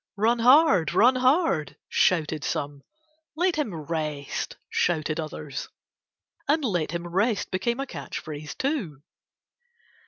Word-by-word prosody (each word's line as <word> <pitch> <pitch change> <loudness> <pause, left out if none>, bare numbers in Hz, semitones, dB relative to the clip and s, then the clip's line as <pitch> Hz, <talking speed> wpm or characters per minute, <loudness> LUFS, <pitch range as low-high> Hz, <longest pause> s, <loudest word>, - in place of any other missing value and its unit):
"Run 230 +3 +2
hard! 240 - +5
Run 255 +3 +5
hard!" 255 - +2
shouted 155 -4 +1
some. 145 -1 -3 0.5
"Let 355 +2 +1
him 300 -9 -1
rest," 150 -2 -4
shouted 155 -2 0
others. 150 -2 -5 0.8
And 300 0 +2
"let 175 -9 0
him 170 +2 -4
rest" 200 +5 0
became 235 +7 -1
a 275 - -1
catch 145 - -7
phrase 150 -1 -7
too. 210 - -2
175 Hz, 120 wpm, -26 LUFS, 155-255 Hz, 0.8 s, hard